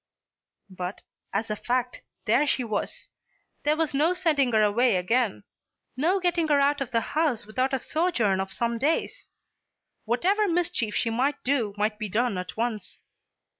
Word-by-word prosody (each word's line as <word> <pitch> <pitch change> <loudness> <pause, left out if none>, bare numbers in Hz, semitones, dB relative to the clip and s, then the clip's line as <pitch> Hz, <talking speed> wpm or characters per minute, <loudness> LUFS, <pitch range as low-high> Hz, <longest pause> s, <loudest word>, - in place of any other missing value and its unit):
But, 180 +1 -6 0.3
as 215 +2 -2
a - - 0
fact, 245 +3 -2 0.2
there 245 +7 +3
she 260 - +1
was. 220 -3 -3 0.5
There 300 +1 +2
was 320 -2 0
no 305 +6 +3
sending 310 -8 +2
her 215 -1 +4
away 225 +2 +3
again; 180 - 0 0.5
no 340 +9 +2
getting 350 -3 +1
her 295 -2 +4
out 285 +1 +2
of 265 - -2
the 230 -3 +1
house 295 -8 +1
without 255 +5 -1
a 265 - +1
sojourn 250 - 0
of 190 0 -3
some 235 +1 -1
days. 305 +6 -1 0.8
Whatever 380 - +2
mischief 335 - 0
she 230 - 0
might 260 +5 0
do 240 -7 0
might 210 +1 0
be 215 -2 -3
done 215 -1 0
at 180 - -7
once. 220 -4 -3
245 Hz, 165 wpm, -26 LUFS, 215-300 Hz, 0.8 s, her